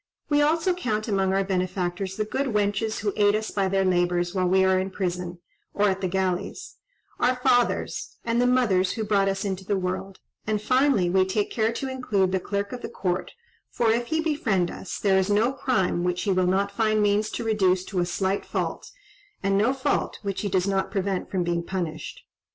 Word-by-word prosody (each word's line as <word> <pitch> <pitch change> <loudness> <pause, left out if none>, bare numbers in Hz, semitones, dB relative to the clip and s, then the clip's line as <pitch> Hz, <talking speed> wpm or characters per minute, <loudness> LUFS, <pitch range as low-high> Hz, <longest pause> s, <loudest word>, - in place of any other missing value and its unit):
We 295 -1 +3
also 325 +5 +2
count 220 -11 -2
among 195 -3 +1
our 195 +1 +2
benefactors 185 0 -2
the 215 - 0
good 270 +6 -2
wenches 205 +1 0
who 205 -1 -1
aid 205 -1 +4
us 215 0 -2
by 195 -2 0
their 195 0 +1
labours 175 -1 +1
while 185 -1 +1
we 190 +1 +4
are 190 0 +3
in 190 +1 -2
prison, 180 -2 -3 0.4
or 205 0 +3
at 190 0 -2
the 185 - 0
galleys; 190 - -2 0.4
our 250 +1 +3
fathers, 245 -1 0
and 235 +1 +1
the 245 - +3
mothers 215 -8 +2
who 225 - -3
brought 200 -2 +2
us 195 +1 -2
into 190 -1 -3
the 200 +1 0
world; 185 +1 -3 0.3
and, 215 -1 +1
finally, 255 -3 +3
we 185 +2 +3
take 195 +2 -1
care 220 0 +1
to 270 - -4
include 215 -8 0
the 190 - +1
Clerk 200 +3 -3
of 250 - -6
the - - -5
Court, 180 -1 -2 0.4
for 230 -2 +1
if 235 +1 0
he 320 0 0
befriend 225 - 0
us, - - -6
there 190 -2 +3
is 190 +1 0
no 220 +6 +2
crime 190 -10 0
which 180 0 -1
he 205 - +1
will 185 -1 +2
not 195 +2 +1
find 215 +1 +1
means 205 +1 +2
to - - -4
reduce 190 -5 +2
to 185 -1 -3
a 175 - +2
slight 190 +2 -1
fault, - - -3 0.5
and 195 0 +2
no 215 +6 +3
fault 270 +1 -1
which 195 -1 -3
he 205 - -2
does 185 -1 +1
not 195 -1 0
prevent 195 -2 -2
from 185 -2 0
being 170 0 0
punished. 170 -3 -5
195 Hz, 210 wpm, -25 LUFS, 185-220 Hz, 0.5 s, aid